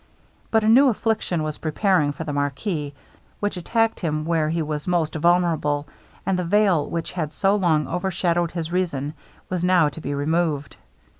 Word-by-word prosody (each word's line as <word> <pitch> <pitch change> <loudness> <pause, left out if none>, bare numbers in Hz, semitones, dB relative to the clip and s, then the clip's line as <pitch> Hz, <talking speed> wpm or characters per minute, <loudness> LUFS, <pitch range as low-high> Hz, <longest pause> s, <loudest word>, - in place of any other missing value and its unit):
But 220 -1 +2
a - - +1
new 260 +6 +7
affliction 215 -8 0
was 155 -1 -4
preparing 160 -1 +1
for 145 +3 -6
the 150 -2 -4
marquis, 145 +1 -2 0.4
which 205 0 -1
attacked 225 +5 0
him 155 -3 -2
where 160 -2 +1
he 165 0 0
was 150 +1 -4
most 170 -3 +1
vulnerable; 160 -3 +1 0.4
and 190 -1 +1
the - - 0
veil, 185 -4 +2
which 165 -1 -3
had 155 -4 -3
so 195 +1 +2
long 165 -7 +2
overshadowed 175 -1 0
his 165 -1 -4
reason, 160 -6 -1 0.3
was 180 -1 -2
now 180 -4 +4
to 160 - -10
be 145 0 -3
removed. 150 -1 -1
170 Hz, 170 wpm, -23 LUFS, 150-185 Hz, 0.4 s, new